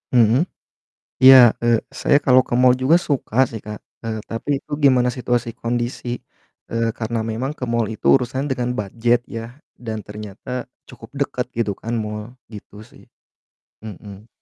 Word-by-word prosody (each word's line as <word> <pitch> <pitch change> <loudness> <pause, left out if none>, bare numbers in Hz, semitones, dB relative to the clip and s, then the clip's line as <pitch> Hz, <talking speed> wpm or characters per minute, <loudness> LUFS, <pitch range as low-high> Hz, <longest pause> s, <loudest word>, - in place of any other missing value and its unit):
Mhm, 120 - +4 0.8
iya, 130 -3 +9
eee, 120 -1 +3 0.2
saya 145 - +4
kalau 130 -1 +6
ke - - -5
mall 125 0 +6
juga 160 +6 +5
suka, 130 -5 0
sih, 110 -2 -7
Kak, 105 -1 -7 0.2
eee, 115 -1 -3
tapi 115 +5 -6
itu - - -25
gimana 125 -3 +5
situasi 120 -2 -1
kondisi, 120 0 -3 0.5
eee, 115 0 0
karena 115 0 -2
memang 125 +6 -3
ke - - -17
mall 115 -1 +1
itu - - -9
urusannya 130 +3 -3
dengan 125 -2 -1
budget, 115 +4 +1
ya, 115 +2 -7 0.2
dan 110 -3 -5
ternyata 105 +4 -7 0.2
cukup - - -13
dekat, 135 -3 -2
gitu 110 -3 0
kan 115 +1 -3
mall, 105 +3 -7 0.2
gitu, 105 -1 -11
sih, - - -19 0.8
mhm. 100 +1 -11
120 Hz, 155 wpm, -21 LUFS, 110-125 Hz, 0.8 s, iya